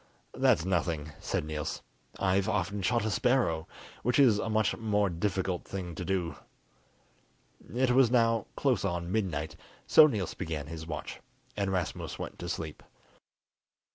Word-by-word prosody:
"That's 80 - +3
nothing," 85 -5 -1
said - - -2
Niels. 75 -1 -4 0.3
"I've 95 +2 +2
often 100 -1 -1
shot 115 +3 +1
a 110 - 0
sparrow, 100 -9 +1 0.3
which 125 +1 +1
is 120 -7 +6
a 115 - -2
much 110 -4 +2
more 105 -3 +1
difficult 95 0 -1
thing 90 -3 -5
to 85 - -5
do." 90 -2 -1 1.4
It 130 0 +3
was 130 -1 +5
now 115 -3 +3
close 130 -9 +1
on 85 -2 -2
midnight, 90 -8 -1 0.3
so 155 - +8
Niels 105 - -2
began 80 -3 -4
his 80 +1 -7
watch, 80 -2 -5 0.4
and 100 -2 -1
Rasmus 90 -3 -2
went - - -7
to 85 - -5
sleep. 80 -2 -4
95 Hz, 145 wpm, -30 LUFS, 85-110 Hz, 1.4 s, so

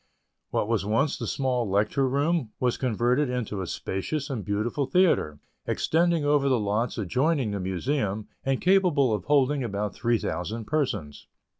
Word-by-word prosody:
What - - -1
was 115 -3 0
once 115 +8 +1
the - - -5
small 125 -5 -1
Lecture 105 +7 +1
Room 140 -2 0
was 125 -2 +1
converted 125 +3 +1
into 115 -5 -3
a 90 - -4
spacious 140 - -3
and 115 -6 -3
beautiful 110 +7 -1
theatre, 160 - +2 0.3
extending 170 -1 +1
over 145 -1 +3
the 130 -3 +3
lots 105 +4 -1
adjoining 125 - 0
the 100 - -3
Museum, 100 +3 -2 0.2
and 135 -1 0
capable 175 - +3
of 105 -4 -3
holding 140 -1 +2
about 105 -2 -3
three 120 -1 +1
thousand 105 +5 -4
persons. 105 - -2
125 Hz, 155 wpm, -26 LUFS, 105-145 Hz, 0.3 s, over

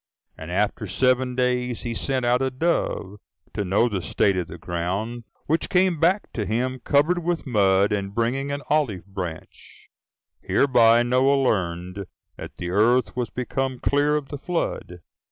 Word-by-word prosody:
And 80 - -9
after 105 +3 -1
seven 125 +5 +1
days 125 -1 0
he 120 -2 -3
sent 130 +2 -1
out 125 +1 +2
a 135 - +1
dove, 130 - -1 0.4
to 105 - -2
know 100 +5 +2
the 100 -5 -2
state 100 +2 +1
of 90 -2 -2
the 85 - -9
ground; 95 +8 -4 0.2
which 160 +3 0
came 180 -3 +2
back 185 +6 +1
to 110 - -2
him 125 +5 -2
covered 155 +7 +2
with 170 -1 -1
mud, 100 -5 +3
and 100 -1 -2
bringing 130 +4 -1
an 140 +1 -4
olive 125 - 0
branch: 90 -5 -8 0.5
hereby 120 -3 +4
Noah 135 +3 +3
learned 90 -3 -1 0.3
that - - -9
the 85 - -4
earth 115 +5 +2
was 125 -1 -2
become 130 +1 -3
clear 145 +3 +1
of 145 -2 -3
the 145 - -6
flood. 140 - -3
120 Hz, 160 wpm, -24 LUFS, 100-135 Hz, 0.5 s, hereby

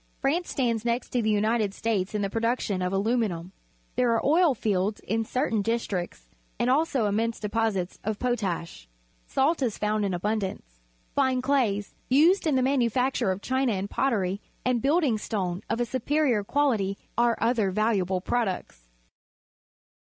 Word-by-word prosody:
France 325 +6 0
stands 230 -4 0
next 235 +1 -1
to 245 - 0
the 220 - 0
United 215 -1 +1
States 215 -3 -1
in 205 - 0
the 195 - -1
production 225 -4 0
of 180 0 -1
aluminiu 205 -2 0
m. 175 +3 -12 0.4
There 250 -1 +2
are 230 - 0
oil 315 -1 +4
fields 205 -1 0
in 225 +1 -1
certain 225 -3 0
districts 195 - -3 0.3
and 245 - +1
also 275 -4 +2
immense 225 +3 0
deposits 210 -4 -1
o 215 - -2
f 215 - -2
potas 230 -8 -1
h. 60 - -14 0.4
Salt 290 +4 +1
is 235 -5 0
found 210 0 0
in 195 -2 0
abun 210 +5 0
dance - - -6 0.3
Fine 260 -2 +1
clays, 235 -7 +1 0.2
used 325 +8 +4
in 295 - +2
the 260 - +2
manufacture 255 -3 +1
of 190 +2 -2
china 260 -2 +1
and 195 +1 -3
pottery, 200 -7 0 0.2
and 250 -2 +1
building 280 -5 +2
stone 185 -4 -2
of 230 - -1
a 240 - +1
superior 260 -2 +1
quahty 215 -6 +1 0.2
are 235 -1 +2
other 225 -4 +2
valuable 190 -2 +1
products. 185 - -3
225 Hz, 165 wpm, -27 LUFS, 200-255 Hz, 0.4 s, oil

